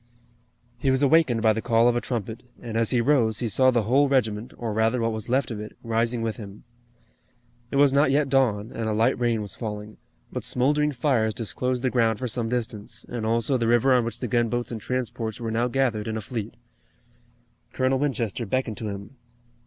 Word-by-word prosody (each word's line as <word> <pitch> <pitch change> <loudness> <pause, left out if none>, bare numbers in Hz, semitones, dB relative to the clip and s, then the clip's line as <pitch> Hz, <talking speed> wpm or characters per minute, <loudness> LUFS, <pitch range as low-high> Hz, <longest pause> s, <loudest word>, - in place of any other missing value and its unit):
He 135 - +1
was 130 +1 +2
awakened 140 -6 +3
by 110 -1 +5
the 110 - -3
call 115 +1 +3
of 120 - +3
a 120 - 0
trumpet, 115 -2 -4 0.2
and, 115 -2 -7
as 115 -1 +2
he 125 - +2
rose, 115 -5 +2
he 120 - -1
saw 130 +5 +4
the 120 -3 +2
whole 135 +6 +3
regiment 115 -4 0
or 115 -3 -3
rather, 110 +3 +1
what 115 0 0
was 110 +1 -5
left 130 0 +1
of 110 - -4
it, 105 0 -9
rising 115 0 0
with 110 -1 -2
him. 105 -2 -10 1.1
It - - -5
was 140 -1 +5
not 140 +1 +4
yet 140 +1 +2
dawn, 120 -5 +1
and 115 -1 -2
a - - 0
light 110 +3 +2
rain 115 -3 +1
was 100 - -7
falling, 105 -2 -6 0.4
but - - -3
smoldering 150 +4 +2
fires 120 -5 +1
disclosed 125 +2 -2
the 130 - +1
ground 115 -3 +2
for 125 - -3
some 115 -1 -1
distance, 120 -1 -4
and 115 -2 -3
also 115 +3 +1
the 115 -2 0
river 120 +3 +4
on 125 -1 +4
which 115 - -5
the 125 - -2
gunboats 120 +2 0
and 115 -2 -5
transports 120 -2 -3
were 115 -1 -3
now 115 +2 +1
gathered 125 -5 0
in 110 0 -2
a - - -4
fleet. 110 -1 -5 1.2
Colonel 130 0 +1
Winchester 120 -5 -1
beckoned 120 -1 -1
to 110 - -4
him. 100 +6 -8
120 Hz, 210 wpm, -25 LUFS, 110-130 Hz, 1.2 s, by